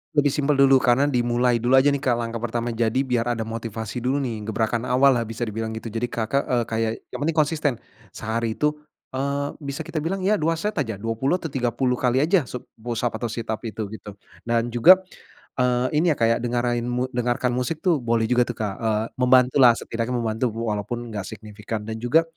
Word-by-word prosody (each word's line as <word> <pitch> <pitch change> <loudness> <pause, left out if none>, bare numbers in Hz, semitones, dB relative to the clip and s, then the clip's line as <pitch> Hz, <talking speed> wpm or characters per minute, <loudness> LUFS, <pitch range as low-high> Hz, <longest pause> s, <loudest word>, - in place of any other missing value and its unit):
Lebih 145 -1 +3
simpel 145 +1 +1
dulu, 135 -1 +6
karena 125 +2 +3
dimulai 120 -3 +2
dulu 120 +3 +3
aja 135 +2 +5
nih, 140 - 0
Kak, 130 -3 +1
langkah 115 0 -3
pertama. 120 +1 -2
Jadi 115 +3 +1
biar 120 -3 0
ada 115 - -2
motivasi 115 0 -5
dulu 130 +4 0
nih, 110 -4 -4
gebrakan 115 +2 -1
awal 130 +2 +5
lah 115 - -3
bisa 115 +2 -4
dibilang 110 0 -3
gitu. 110 0 -6
Jadi, 115 +2 -2
Kakak 120 +1 0
kayak 115 0 -2
yang 125 - -6
penting 165 - 0
konsisten, 155 -2 +1 0.4
sehari 115 0 -2
itu, 150 0 +2 0.4
eee, 140 +2 -1
bisa 140 -2 -5
kita 160 - -4
bilang 185 +5 -2
ya, 205 +2 +2
2 165 +2 +1
set 205 +2 -2
aja, 115 -6 -1
20 115 - -1
atau 165 -4 -5
30 125 -1 0
kali 130 +2 +2
aja 165 -3 +2
sub-push 120 -1 -6
up 115 -2 -1
atau 120 - -2
sit 115 0 -5
up 110 - -2
itu, 110 0 -4
gitu. 105 -2 -9 0.3
Dan 115 0 +1
juga, 135 +11 +8 0.6
eee, 125 0 +2
ini 170 - +2
ya, - - -18
kayak 115 0 +3
dengerin 120 0 0 0.3
dengarkan 125 0 0
musik 125 +7 -2
tuh 175 -6 +3
boleh 115 -2 +1
juga 125 0 +4
tuh, 120 - -4
Kak, 105 -3 -2
eee, 110 -1 0
membantulah 125 -1 +5
setidaknya 115 +2 -3
membantu 115 +1 0
walaupun 115 +1 -3
enggak 105 -3 -5
signifikan. 105 0 -6
Dan 110 +1 -5
juga, 130 +8 +3
120 Hz, 200 wpm, -23 LUFS, 115-135 Hz, 0.6 s, juga